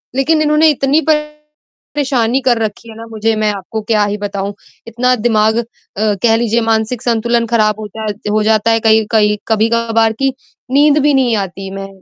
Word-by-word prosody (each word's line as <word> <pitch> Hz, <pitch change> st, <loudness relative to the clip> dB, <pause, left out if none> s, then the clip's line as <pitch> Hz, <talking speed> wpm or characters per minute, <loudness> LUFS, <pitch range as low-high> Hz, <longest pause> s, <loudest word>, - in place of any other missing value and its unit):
लेकिन 310 Hz, +4 st, +2 dB
इन्होंने 305 Hz, +1 st, +3 dB
इतनी 285 Hz, +2 st, +1 dB
परेशानी 300 Hz, -4 st, -2 dB
कर 240 Hz, -2 st, +3 dB
रखी 220 Hz, +2 st, -5 dB
है 220 Hz, -, -11 dB
ना 230 Hz, -, -9 dB
मुझे 220 Hz, 0 st, -1 dB
मैं 215 Hz, -1 st, 0 dB
आपको 200 Hz, +3 st, -6 dB
क्या 210 Hz, -1 st, +1 dB
ही 205 Hz, +1 st, -3 dB
बताऊँ, 200 Hz, 0 st, -4 dB, 0.3 s
इतना 250 Hz, +2 st, +1 dB
दिमाग 220 Hz, -1 st, +1 dB
अ, 235 Hz, -, 0 dB, 0.4 s
कह 215 Hz, +1 st, +2 dB
लीजिए 230 Hz, 0 st, 0 dB
मानसिक 225 Hz, +1 st, -1 dB
संतुलन 235 Hz, 0 st, 0 dB
खराब 215 Hz, -2 st, +1 dB
हो 215 Hz, -, -6 dB
जाए 215 Hz, -1 st, -3 dB, 0.2 s
हो 215 Hz, 0 st, +1 dB
जाता 220 Hz, +1 st, +2 dB
है 225 Hz, -, +2 dB
कई 220 Hz, 0 st, +4 dB
कई 210 Hz, -1 st, +2 dB
कभी-कभार 225 Hz, 0 st, +1 dB
कि 270 Hz, -1 st, +1 dB, 0.4 s
नींद 290 Hz, +2 st, +4 dB
भी 295 Hz, -1 st, +3 dB
नहीं 250 Hz, -4 st, +2 dB
आती 190 Hz, +1 st, -9 dB
मैं 195 Hz, 0 st, -6 dB
225 Hz, 180 wpm, -15 LUFS, 215-255 Hz, 0.4 s, कई